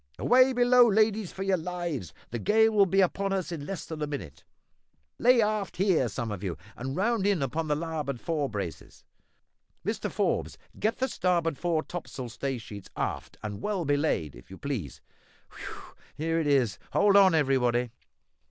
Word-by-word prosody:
Away 255 +1 +5
below, 245 -1 +5
ladies, 215 -2 +2
for 190 - -5
your 195 -1 +2
lives; 170 - -4 0.2
the 120 - -3
gale 220 - +4
will 205 -2 +4
be 195 +2 +3
upon 195 +2 +1
us 185 -2 -2
in 150 -4 -5
less 195 -5 -5
than 160 -2 -7
a 150 - -1
minute. 100 - -7 0.8
Lay 245 -1 +5
aft 210 -3 -2
here, 180 -9 +3
some 110 +2 -4
of 100 -2 -5
you, 90 -4 -3 0.2
and 135 +2 -5
round 205 +1 +1
in 195 -8 +2
upon 155 +5 -2
the 150 - +1
larboard 150 -5 -3
fore 150 -2 -1
braces! 100 -6 -6 0.8
Mr - - -2
Forbes, - - -1 0.2
get 220 +2 0
the 260 - 0
starboard 170 - 0
fore 165 -3 0
topmast 130 -8 -6
staysail 135 0 -2
sheets 105 -4 -10
aft - - -3
and 105 0 -5
well 195 -5 -1
belayed, 145 - 0
if - - -15
you 95 - -10
please. 120 - -5 0.5
Whew! - - -9 0.2
here 165 +2 0
it 160 - 0
is; 130 -7 +2
hold 200 0 +4
on, 190 -4 +7
everybody!" 125 -5 +2
165 Hz, 175 wpm, -28 LUFS, 130-195 Hz, 0.8 s, on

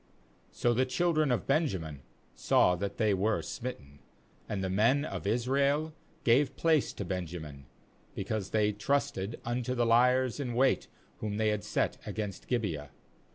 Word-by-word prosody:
36So 120 -1 +1
the 130 +2 +3
children 155 0 +2
of 120 - 0
Benjamin 95 - 0 0.3
saw 90 - +3
that 100 +3 -4
they 110 -3 +3
were 105 +3 +1
smitten. 70 - -7 0.5
And 100 -2 -2
the - - 0
men 120 +9 +3
of 100 - -5
Israel 140 +7 +1 0.3
gave 135 +3 +3
place 160 -4 +2
to 100 - -5
Benjamin, 80 -6 -5 0.5
because 100 0 -3
they 105 -1 +2
trusted 110 -1 -1
unto 125 +1 -1
the 120 -1 +2
liers 125 +2 +3
in 125 -4 -3
wait 130 +2 +2 0.3
whom 105 -1 -3
they 110 0 +2
had 105 -1 0
t - - -11
set - - 0
against 105 -3 -5
Gibeah. 85 - -2
115 Hz, 155 wpm, -30 LUFS, 100-130 Hz, 0.5 s, the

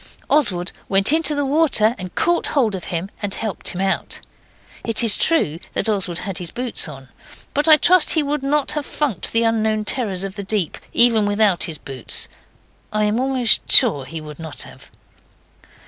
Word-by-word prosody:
Oswald 190 -12 +2 0.2
went 195 +7 +4
into 315 -2 +3
the 285 0 -1
water 270 -7 +3
and 185 -1 -8
caught 345 0 0
hold 240 -8 0
of 190 - -6
him 175 +3 -5
and 205 -2 -2
helped 220 -3 -5
him 180 - -1
out. 195 0 -2 0.6
It 230 0 +2
is 220 -3 +5
true 170 - 0
that - - +1
Oswald 190 -5 -1
had 195 -1 -5
his 175 -2 -4
boots 245 -1 0
on, 135 -3 -12 0.4
but 290 +3 0
I 310 -1 +8
trust 360 +1 +4
he 315 - +2
would 290 0 -3
not 280 +1 0
have 300 - -2
funked 280 - -2
the 230 0 +1
unknown 220 -1 0
terrors 205 -7 -1
of 195 +1 -7
the 200 - -5
deep, 195 -4 -2
even 230 -3 +5
without 205 -3 +2
his 160 -3 -4
boots, 135 -4 -3 0.6
I 215 0 0
am 210 +2 0
almost 260 -3 +1
sure 170 - +5
he 160 +5 -7
would 150 0 -11
not 160 -3 -5
have. - - -15
215 Hz, 185 wpm, -19 LUFS, 185-270 Hz, 0.6 s, I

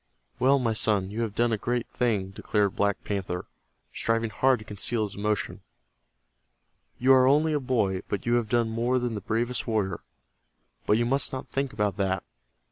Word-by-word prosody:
"Well, 135 +2 +5
my 120 -4 0
son, 105 -3 +1
you 110 +3 -3
have 110 -3 -3
done 120 0 +2
a 110 - -1
great 120 +1 -1
thing," 105 -6 0
declared 100 0 0
Black 100 -1 0
Panther, 95 -3 -3 0.5
striving 115 -1 0
hard 130 +5 +3
to 110 - -12
conceal 110 +2 -1
his 100 -2 -4
emotion. 105 +1 -2 1.4
"You 130 +2 +5
are 130 -1 +6
only 155 +3 +3
a 150 - +1
boy, 110 -8 0
but 100 - -3
you 120 - +1
have 120 -3 +1
done 120 0 +2
more 120 +3 0
than 120 -2 -1
the 105 - -4
bravest 120 +6 -1
warrior. 100 -6 0 0.9
But 105 - +4
you 120 - +1
must 135 +2 0
not 130 - -6
think 135 -1 -1
about 105 -3 -1
that. 95 -1 0
115 Hz, 185 wpm, -27 LUFS, 100-125 Hz, 1.4 s, are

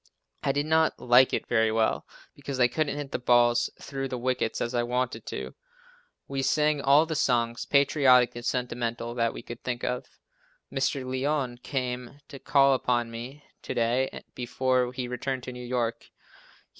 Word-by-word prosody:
I 140 - +1
did 145 +1 -1
not 160 +1 +2
like 125 +1 +5
it - - -1
very 110 -2 +2
well, 110 0 0 0.3
because 140 -2 -6
I 125 - +6
couldn't 150 +2 -1
hit 145 -2 -5
the - - -2
balls 120 -1 +3
through 135 -1 -4
the 125 - -4
wickets 125 -2 -1
as 120 - -2
I 120 - +2
wanted 125 +1 -2
to. - - -5 0.7
"We" 135 -1 -2
sang 150 +1 +2
all 140 +3 +5
the 160 - -3
songs, 120 -5 0
patriotic 135 -4 +4
and 120 - -7
sentimental, 120 -1 -2
that 115 -1 +1
we - - -9
could 120 0 -9
think 125 -1 -3
of. 125 0 -2 0.7
Mr. 135 0 0
Lyon 130 -1 -1
came 125 0 -4
to 140 - -9
call 140 -1 +4
upon 120 -2 0
me 125 +6 -8 0.2
to - - -5
day, 120 +3 0
before 125 0 0
he 125 -1 -4
returned 125 +1 -3
to 125 - -6
New 125 0 -8
York. 120 -2 -2
125 Hz, 170 wpm, -27 LUFS, 120-135 Hz, 0.7 s, I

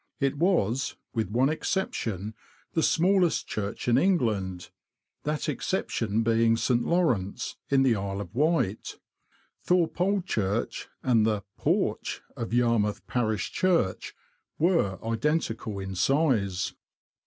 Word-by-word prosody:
It 140 0 +1
was, 135 - +1 0.2
with 110 -5 -1
one 125 +6 +2
exception, 110 - -2 0.4
the 165 - +2
smallest 180 +1 +3
church 105 +2 -4
in 120 +1 +4
Eng 190 +2 +4
land, 95 - -2 0.5
that 150 0 -1
exception 115 - -1
being 115 0 +3
St. 120 +1 +1
Lawrence, 125 - 0
in 135 -1 +4
the 125 -4 +4
Isle 100 -1 -3
of 95 -2 -9
Wight. 145 - 0 0.7
Thorpe 175 -1 +1
Old 195 0 +1
Church 105 - -2 0.2
and 120 -4 +3
the 105 -2 0
porch - - -1
of 115 - -5
Yarmouth 115 -4 +1
Parish 110 -6 -1
Church 170 - 0 0.4
were 160 - +2
identical 115 -3 -1
in 95 0 -5
size. 100 - +1
115 Hz, 120 wpm, -27 LUFS, 105-155 Hz, 0.7 s, in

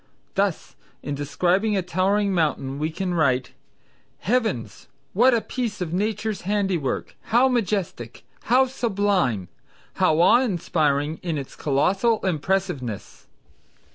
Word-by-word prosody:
Thus 195 -3 -1 0.3
in 145 - -3
describing 180 +9 +1
a 190 - 0
towering 195 +3 +1
mountain 145 -5 -1
we 155 +1 0
can 180 +2 -3
write 130 -7 +1 0.7
"Heavens, 195 - -1 0.3
what 245 +7 +5
a 230 - +1
piece 230 -4 -4
of 175 -3 -3
Nature's 215 +2 -1
handiwork! 190 -7 -1
how 240 +4 +4
majestic! 200 - -2 0.2
how 255 +3 +4
sublime! 200 - 0 0.5
how 155 0 +3
awe 210 +8 +6
inspiring 155 - 0
in 170 -4 -2
its 135 -2 -7
colossal 195 - +2
impressiveness!" 175 - -2
185 Hz, 115 wpm, -24 LUFS, 150-210 Hz, 0.7 s, awe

